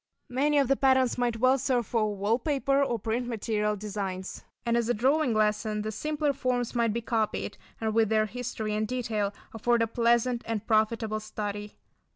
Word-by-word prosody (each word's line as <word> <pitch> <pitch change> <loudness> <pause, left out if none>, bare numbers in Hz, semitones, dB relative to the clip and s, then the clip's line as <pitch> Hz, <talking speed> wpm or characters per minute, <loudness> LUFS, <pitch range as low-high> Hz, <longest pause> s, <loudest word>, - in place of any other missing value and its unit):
Many 290 +4 +2
of 280 -2 +4
the 275 - +3
patterns 260 -2 +3
might 240 -2 0
well 255 +3 +4
serve 250 -2 +1
for 215 -1 0
wall 205 +5 +1
paper 275 0 +1
or 240 -4 0
print 230 +3 -2
material 210 -2 -1
designs. 195 -2 -5 0.2
And 235 0 +2
as 235 -1 +1
a 245 - +2
drawing 260 +2 +2
lesson, 210 0 +1
the 215 - -3
simpler 300 +6 -1
forms 250 -3 -1
might 235 -2 +2
be 235 +2 -2
copied 220 -2 -1 0.2
and 220 -1 -1
with 220 -1 +3
their 215 -1 +3
history 220 -2 -4
and 215 +1 0
detail, 225 -5 -1 0.2
afford 235 +1 +2
a - - +3
pleasant 235 +1 +2
and 225 -2 -2
profitable 220 0 +1
study. 210 -1 -5
230 Hz, 185 wpm, -28 LUFS, 215-250 Hz, 0.2 s, of